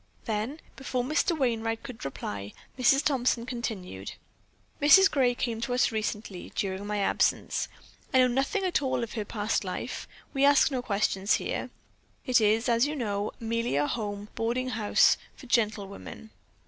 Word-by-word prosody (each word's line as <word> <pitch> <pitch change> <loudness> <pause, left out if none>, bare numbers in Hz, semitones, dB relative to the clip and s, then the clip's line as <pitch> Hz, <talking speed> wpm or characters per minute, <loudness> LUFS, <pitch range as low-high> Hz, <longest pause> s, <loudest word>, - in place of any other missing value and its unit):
Then 225 +7 -2 0.2
before 255 -2 -2
Mr. 310 +5 +1
Wainright 225 -4 0
could 255 -5 -8
reply, 100 -6 -5 0.2
Mrs. 270 +3 +4
Thompson 250 -4 +1
continued: 210 - -5 0.7
"Mrs. 385 +7 +7
Gray 255 -4 +2
came 230 -2 -2
to 245 +1 -1
us 250 - +3
recently, 215 -3 -4
during 195 +1 -2
my 210 0 -1
absence. 200 - +1 0.4
I 265 - +3
know 255 -1 +6
nothing 270 - 0
at 365 -4 +1
all 260 -3 0
about 230 - -6
her 215 -3 -3
past 210 +1 -1
life; 185 -1 -5 0.3
we 275 -1 +1
ask 285 +1 +5
no 255 -2 -1
questions 200 -3 +1
here. - - -3 0.6
It 250 -4 +4
is, 220 +3 +3
as 235 +3 +3
you 300 - -3
know, 210 -5 -2
merely 230 -4 -1
a 145 +1 +2
home 205 +1 -4
boarding 240 +3 -1
house 220 -4 +4 0.2
for - - -13
gentlewomen. 215 -2 -2
230 Hz, 160 wpm, -28 LUFS, 210-255 Hz, 0.7 s, Mrs